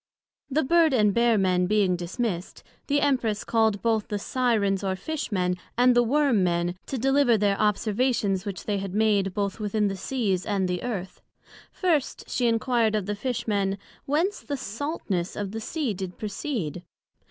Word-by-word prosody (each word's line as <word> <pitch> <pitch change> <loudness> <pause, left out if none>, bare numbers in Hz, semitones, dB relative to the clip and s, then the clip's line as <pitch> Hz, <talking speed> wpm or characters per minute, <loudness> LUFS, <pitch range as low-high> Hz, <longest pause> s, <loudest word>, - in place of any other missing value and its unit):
The 295 +3 +1
Bird 320 0 +4
and 210 -4 +3
Bear 235 0 +3
men 180 -2 +2
being 200 -3 +2
dismissed, 180 +1 -4 0.2
the 285 0 +2
Empress 235 -6 +1
called 220 -3 +1
both 225 -2 +1
the 205 - -2
Syrens 205 -4 0
or 190 -1 0
Fish 310 +6 -4
men, 180 -2 0 0.2
and 250 0 +5
the 240 - +6
Worm 255 -4 +2
men, 175 0 0
to 270 - -3
deliver 270 -1 +3
their 200 -1 +2
Observations 210 -1 +1
which 200 -3 -5
they 205 -2 -1
had 195 -1 -5
made, 205 -3 +2
both 200 0 -2
within 210 0 0
the 195 - -3
Seas, 195 -2 -1
and 195 -3 0
the 180 -1 -2
Earth. 195 -7 -5 0.5
First, 325 -7 -1
she 245 - 0
enquired 230 -1 +2
of 210 -3 -1
the 205 - -2
Fish 240 +3 -3
men 200 -2 0 0.3
whence 330 +8 +1
the 285 -2 -4
saltness 215 - -3
of 205 -2 -4
the 225 +1 -5
Sea 275 -1 -2
did 185 -1 -6
proceed? 210 - -4
215 Hz, 175 wpm, -26 LUFS, 195-250 Hz, 0.5 s, the